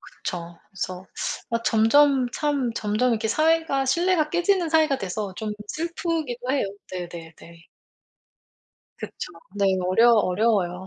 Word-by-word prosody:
그쵸. 170 -2 -7
그래서 185 -1 -5 0.4
아 230 0 -1
점점 260 +4 +4
참 285 -5 -1
점점 215 +4 0
이렇게 220 -1 0
사회가 310 +1 +2
신뢰가 335 +2 +2
깨지는 350 0 +1
사회가 310 -3 +3
돼서 195 0 -4
좀 215 +1 -4
슬프기도 315 -5 -3
해요. 270 -6 +1 0.3
네네네. 170 -3 -7 1.7
그쵸. - - -7 0.2
네. 200 -1 +1 0.2
어려 230 +6 +5
어려워요. 190 -3 +1
235 Hz, 260 characters per minute, -24 LUFS, 200-305 Hz, 1.7 s, 어려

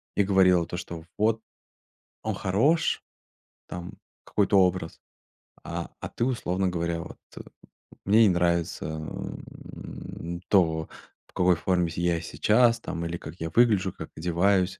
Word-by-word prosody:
и 100 - +4
говорила 95 -3 +4
то, 90 - -5
что: 85 -2 -7
"Вот 110 +1 +2 0.8
он - - -1
хорош". 135 - +2 0.6
Там 90 0 -7 0.3
какой-то 100 -1 +2
образ. 90 -3 +1 0.6
А - - -5
а - - -4
ты, 120 - -1
условно 95 -7 0
говоря, 85 -1 -1
вот: - - -10 0.9
"Мне 110 +4 +6
не - - +5
нравится, 85 -2 +1
м, 80 +2 -7
то, 80 -5 +3 0.4
в - - -26
какой 90 0 +4
форме 90 0 +1
с - - -8
я 85 -1 +1
сейчас 115 +8 +3
там, 85 0 -4
или 85 +1 -3
как 85 - -9
я 80 0 -3
выгляжу, 105 -3 +3
как 80 - -8
одеваюсь". 90 +3 +1
90 Hz, 140 wpm, -27 LUFS, 85-100 Hz, 0.9 s, Мне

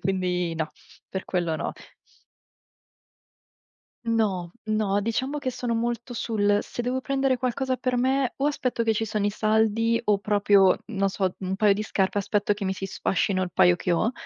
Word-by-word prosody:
quindi 180 -3 -1
no, 160 -1 -3 0.4
per 190 - -4
quello 175 -3 -1
no. - - -3 2.3
No, 210 -7 0 0.2
no, 210 -2 +1
diciamo 260 +7 -1
che 255 -3 -3
sono 240 -1 -2
molto 240 +1 -2
sul: 205 -3 +1
se 240 - -5
devo 255 +2 -1
prendere 270 -1 +1
qualcosa 255 +1 -1
per 250 0 -1
me 260 +1 +1
o 275 - +1
aspetto 255 -5 -1
che 225 -1 +2
ci 225 - 0
sono 210 -1 -1
i 205 - +2
saldi 220 +2 +2
o 210 -2 +3
proprio, 200 -1 +4
non 195 -3 0
so, 190 -1 -1
un 190 0 -3
paio 205 +1 +4
di 210 +2 -2
scarpe 195 -1 0
aspetto 205 +1 +1
che 205 -1 -4
mi 190 - 0
si 190 - -6
sfascino 190 0 0
il 175 - -8
paio 180 -2 +5
che 175 - -1
ho, 215 +7 +2
210 Hz, 175 wpm, -25 LUFS, 195-240 Hz, 2.3 s, paio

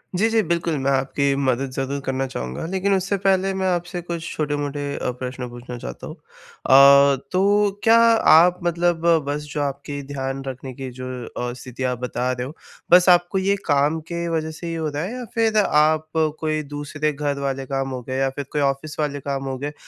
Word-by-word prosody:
जी, 215 +5 +3
जी 225 -1 +3
बिल्कुल 170 -3 -1
मैं 140 - +2
आपकी 135 +1 +1
मदद 135 -1 0
ज़रूर 135 +2 -3
करना 135 0 -1
चाहूँगा 65 - -5
लेक़िन 190 +2 0
उससे 195 +2 0
पहले 195 0 +2
मैं 190 0 -1
आपसे 175 0 -2
कुछ 170 -1 -5
छोटे-मोटे 145 -1 -2
अ, 125 - -2
प्रश्न 125 0 -6
पूछना 120 0 -8
चाहता 60 - -8
हूँ। - - -8
अ, 140 +1 +4 0.2
तो 200 +2 +3
क्या 230 0 +6
आप 180 -6 +5
मतलब 170 -1 0 0.2
बस 145 +1 -2
जो 150 - -1
आपकी 140 0 -4
ध्यान 135 0 -3
रखने 130 0 -6
की 130 0 -6
जो 130 - -5 0.2
अ, 120 0 -5
स्थिति 125 0 -8
आप 125 -1 -1
बता 125 0 -2
रहे 125 0 -3
हो। 150 - -9 0.4
बस 180 +1 +7
आपको 175 +2 +4
ये 195 +1 +2
काम 145 +2 +2
के 170 0 -2
वज़ह 160 0 -3
से 170 +2 -8
ही 165 - -3
हो 160 -1 -2
रहा 145 +2 -3
है 205 +7 -4
या 250 -1 -6
फ़िर 225 -1 +2
आप 155 -1 +2 0.3
कोई 155 -1 -1
दूसरे 150 +1 -2
घर 145 -1 -2
वाले 135 -1 -2
काम 135 0 -2
हो 130 -1 -5
गए 130 +1 -4
या 135 0 +2
फ़िर 140 +1 -6
कोई 150 - 0
ऑफ़िस 140 +3 -2
वाले 145 -1 -1
काम 135 0 -3
हो 130 - -3
गए 145 +2 -5
145 Hz, 205 wpm, -22 LUFS, 135-175 Hz, 0.4 s, बस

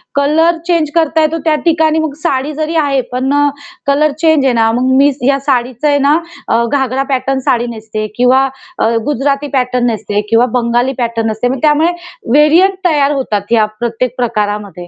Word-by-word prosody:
Colour 315 +4 +2
change 335 -4 +1
करता 320 -1 +2
येतो, 310 +1 +1
त्या 315 - +3
ठिकाणी 320 -1 +2
मग 315 -2 -2
साडी 285 -2 -1
जरी 310 +2 -3
आहे, 275 -2 0
पण 260 +2 -1
अ, 290 0 +3 0.4
कलर 290 +2 +2
चेंज 315 -4 +3
आहे 260 - +2
ना. 225 -1 +2
मग 250 +3 0
मी 285 +1 +4 0.2
या 275 0 +2
साडीचं 255 -1 -1
आहे 285 -1 +2
ना 300 +2 +4 0.3
अ, 230 +1 +2
घागरा 265 -1 0
पॅटर्न 265 +1 -1
साडी 240 0 +1
नेसते 215 -1 -5
किंवा 255 +2 +3 0.3
अ, 225 - +2 0.2
गुजराती 285 +1 -1
पॅटर्न 250 -2 0
नेसते 210 -2 -2
किंवा 230 +2 +4
बंगाली 240 +2 0
पॅटर्न 230 -2 -1
नेसते. 220 +2 -1
मग 260 +1 -2
त्यामुळे 310 +3 +3 0.4
व्हेरियंट 320 +8 +4
तयार 295 -4 +2
होतात 215 -7 -3
या 225 -2 +4
प्रत्येक 240 +1 -2
प्रकारामध्ये. 210 -6 -3
270 Hz, 180 wpm, -13 LUFS, 235-300 Hz, 0.4 s, मी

